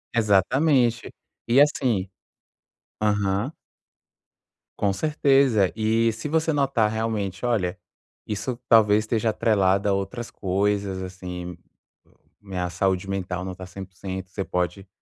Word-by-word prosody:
Exatamente, 120 - +2 0.4
e 120 +4 +4
assim 120 -10 +2 0.9
Aham. 105 +4 +1 1.3
Com 100 -1 +2
certeza, 135 -7 +3
e 115 +1 +2
se 115 +7 -6
você 160 +1 +1
notar 135 -6 +2
realmente, 110 -3 -2
olha, 100 -7 0 0.5
isso 115 +4 -3
talvez 105 -2 +6
esteja 110 0 +1
atrelada 100 -2 +2
a 100 - +3
outras 100 +5 -3
coisas, 100 0 -1
assim, 90 -1 -7 0.8
minha 90 -3 -4
saúde 95 +2 -1
mental 90 -2 -3
não 95 -1 -5
tá 95 0 -9
100%, 95 0 -7
você 95 0 -4
pode 90 +2 -2
100 Hz, 110 wpm, -24 LUFS, 95-115 Hz, 1.3 s, talvez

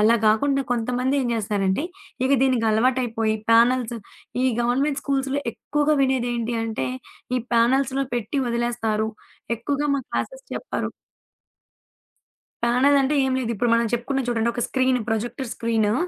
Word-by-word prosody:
అలా 220 +2 +5
గాకుండా 275 +6 +3
కొంతమంది 250 +3 0
ఏం - - -1
జేస్తారంటే 205 -1 0 0.4
ఇవి 275 +1 +4
దీనికి 255 -4 +2
అలవాటైపోయి 225 -1 +1 0.2
ప్యానెల్స్, 240 +1 +4 0.5
ఈ - - +2 0.2
గవర్నమెంట్ 270 +4 +1
స్కూల్స్‌లో 275 0 0
ఎక్కువగా 295 +5 0
వినేదేంటి 240 -3 0
అంటే 220 -13 -2 0.5
ఈ - - +2 0.2
ప్యానెల్స్‌లో 265 +3 +2
పెట్టి 240 +4 -2
వదిలేస్తారు. 235 -2 0 0.5
ఎక్కువగా 285 +5 -1
మా - - -1
క్లాసెస్ - - -4
చెప్పరు. - - -3 1.7
ప్యానెలంటే 270 +4 +3
ఏం 260 - 0
లేదు. 240 -3 -2
ఇప్పుడు 235 +3 0
మనం 230 0 +2
చెప్పుకున్నాం 250 +2 -1
చూడండి 235 -1 +1
ఒక 240 - -1
స్క్రీన్, 260 -1 +2
ప్రొజెక్టర్ 240 +4 -2
స్క్రీను 225 -2 +1
240 Hz, 125 wpm, -23 LUFS, 230-270 Hz, 1.7 s, అలా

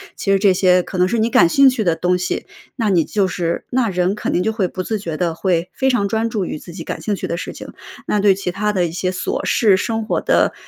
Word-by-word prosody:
其 195 - -1
实 195 - +3
这 195 -2 +4
些 180 -1 +4
可 185 - -7
能 180 - +4
是 235 - -1
你 225 +2 +1
感 170 -6 +5
兴 275 +4 +6
趣 245 -4 -1
的 170 -3 +1
东 180 0 +1
西， 180 - -3 0.3
那 225 -4 0
你 175 -5 +3
就 200 +2 0
是 170 -2 -3
那 245 -3 +1
人 180 +1 0
肯 210 - -3
定 180 - +1
就 220 +1 0
会 195 -5 0
不 185 - -5
自 215 +1 -2
觉 165 -5 -5
地 170 -2 -1
会 180 -1 0
非 265 - +1
常 220 -6 +1
专 225 +2 -1
注 205 -5 -2
于 - - -5
自 175 - -11
己 170 -3 -7
感 - - -5
兴 210 - -2
趣 - - -5
的 170 - -2
事 - - -5
情， - - -10 0.3
那 210 - +1
对 200 -2 +5
其 190 -2 -3
他 210 +3 -1
的 180 -3 +1
一 - - -7
些 180 +1 -2
琐 185 - -3
事， 210 -5 +3
生 225 +2 -2
活 - - -1
的 - - +2
195 Hz, 305 characters per minute, -19 LUFS, 180-220 Hz, 0.3 s, 兴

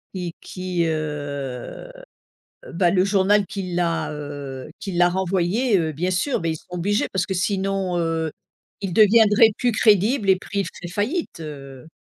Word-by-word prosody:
Et 175 -2 -4
qui 180 -2 -2
heu, 145 - -4 0.8
bah, 175 0 +3
le 185 0 +3
journal 200 0 +3
qui 190 -3 -5
l'a, 170 -3 0
heu, 145 -2 -7
qui 200 -3 -5
l'a 175 0 +4
renvoyé, 190 +5 +1
heu, 160 -2 -1
bien 180 +6 -1
sûr, 205 +9 0
beh, 165 -1 -1
ils 160 - -2
sont - - -17
obligés 185 +4 0
parce 190 -2 0
que 195 - -4
sinon, 190 -1 -1
heu, 165 -1 -1 0.5
ils 195 -3 -2
deviendraient 215 +1 +6
plus 245 -1 +1
crédibles 210 +1 +3
et 190 - +6
pris 200 +2 -6
il 190 - -2
feraient 175 0 -8
faillite, 235 - -2
heu 140 -2 -9
180 Hz, 165 wpm, -22 LUFS, 160-200 Hz, 0.8 s, deviendraient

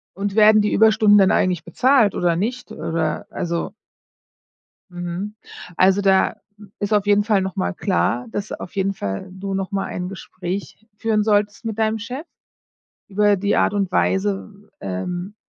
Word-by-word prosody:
Und 200 +1 -3
werden 215 0 +6
die 210 - 0
Überstunden 215 -1 +5
dann 195 -2 +5
eigentlich 180 -3 +1
bezahlt 245 - +3
oder 175 -2 +1
nicht 240 +8 -3
oder, 160 -2 -2
also 170 -2 -3 1.2
Mhm. 175 +4 -5 0.4
Also, 190 +3 +4
da 195 -1 +3 0.4
ist 205 +1 -1
auf 205 -1 +2
jeden 205 0 +4
Fall 210 -2 +2
noch 190 +1 -4
mal 195 0 -1
klar, 180 - 0
dass 205 -1 -4
auf 180 - -7
jeden 195 0 0
Fall 100 - -5
du 195 +1 -5
noch 190 -1 -3
mal 195 -1 -1
ein 180 0 -5
Gespräch 190 +2 -6
führen 220 -1 +1
solltest 205 +1 +1
mit 220 -1 -3
deinem 220 0 0
Chef 255 +8 -6 0.8
über 205 0 +3
die 200 +2 0
Art - - +2
und 195 -3 0
Weise, 200 +2 -1
ähm, 175 - -4
200 Hz, 160 wpm, -21 LUFS, 185-210 Hz, 1.2 s, werden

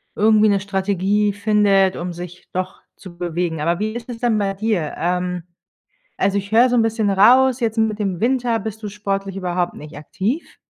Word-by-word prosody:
irgendwie 215 0 +4
'ne 200 -1 +2
Strategie 200 +1 0
findet, 200 -2 +3
um 175 0 -4
sich 175 +1 -9
doch 185 +1 -4 0.2
zu 175 -3 -12
bewegen. 170 -2 -2
Aber 170 +3 0
wie 215 +1 -2
ist 240 +1 -7
es 230 -2 -6
denn 235 -3 +1
bei 195 -1 0
dir? 195 -6 -1
Ähm, 180 0 -1 0.7
also, 200 +1 +1
ich 200 +1 -4
höre 240 +3 +5
so 245 - +1
'n 235 - +4
bisschen 220 -2 0
raus, 250 +6 +5
jetzt 225 -1 -1
mit 220 -1 +1
dem 190 -4 -2
Winter 240 -2 +1
bist 220 +1 -6
du - - -3
sportlich 195 -1 -3
überhaupt 180 -2 -2
nicht 150 +1 -10
aktiv? 210 - -4
200 Hz, 190 wpm, -20 LUFS, 180-220 Hz, 0.7 s, höre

